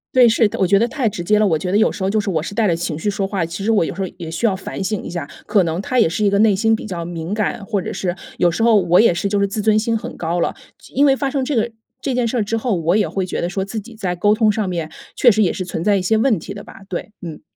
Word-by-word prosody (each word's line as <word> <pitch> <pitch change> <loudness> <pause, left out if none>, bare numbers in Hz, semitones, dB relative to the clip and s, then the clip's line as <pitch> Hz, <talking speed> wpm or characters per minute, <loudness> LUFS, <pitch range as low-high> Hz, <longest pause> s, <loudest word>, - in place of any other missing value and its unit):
对， 250 -2 +7
是 225 0 +3
的， - - -6
我 190 - +2
觉 195 +2 +4
得 235 - +2
太 245 -3 -1
直 185 - -6
接 210 +5 +2
了， 215 - +4
我 160 -6 +2
觉 180 - -3
得 - - +4
有 215 - +3
时 - - -8
候 190 - +1
就 215 +1 +1
是 200 - -3
我 160 -5 0
是 190 +5 -6
带 220 -3 +2
着 170 - +3
情 165 -2 -3
绪 185 +6 -1
说 195 -1 -1
话， 190 -4 -1
其 180 +4 -6
实 - - 0
我 220 -5 +4
有 - - -3
时 195 - -6
候 190 - -1
也 165 -3 -7
需 165 +8 -2
要 205 -4 +2
反 190 - -6
省 195 +2 -2
一 - - -6
下。 170 -4 -5 0.2
可 200 -3 +3
能 165 +1 -2
他 255 +3 0
也 225 - +5
是 170 +6 -2
一 205 - +4
个 200 0 +1
内 215 -2 +5
心 225 +3 +2
比 220 - -2
较 180 -5 -4
敏 170 +1 -5
感， 215 +2 -1
或 205 -2 -1
者 - - -5
是 180 -2 -2 0.2
有 175 - +3
时 170 +6 -1
候 225 -2 +5
我 175 0 +3
也 225 - +4
是 175 +4 -2
就 200 0 0
是 - - +4
自 200 +2 -3
尊 215 0 +3
心 225 +1 +1
很 - - -7
高 170 +1 -2
了， - - 0 0.3
就 - - -17
因 280 - +5
为 275 - +5
发 275 0 -1
生 270 -1 -1
这 290 - -2
个 235 -2 +1 0.3
这 270 - -2
件 245 -1 +1
事 230 +1 0
之 225 - -1
后， 225 -1 -1
我 170 +2 +1
也 210 -1 +2
会 190 -1 -2
觉 180 - -3
得 175 - -1
说 190 +1 -2
自 200 +3 -6
己 220 +3 -7
在 190 -5 -3
沟 205 +4 +3
通 215 0 +3
上 210 -2 0
面， 165 -3 -3 0.3
确 250 - +6
实 215 -1 +3
也 180 - +2
是 185 - -4
存 165 -2 -4
在 205 +1 +3
一 - - -1
些 205 +5 +1
问 220 -3 +2
题 200 - -8
的 205 0 -9
吧， - - -13
对， 185 +3 -5
嗯。 165 -3 -8
200 Hz, 370 characters per minute, -19 LUFS, 175-220 Hz, 0.3 s, 对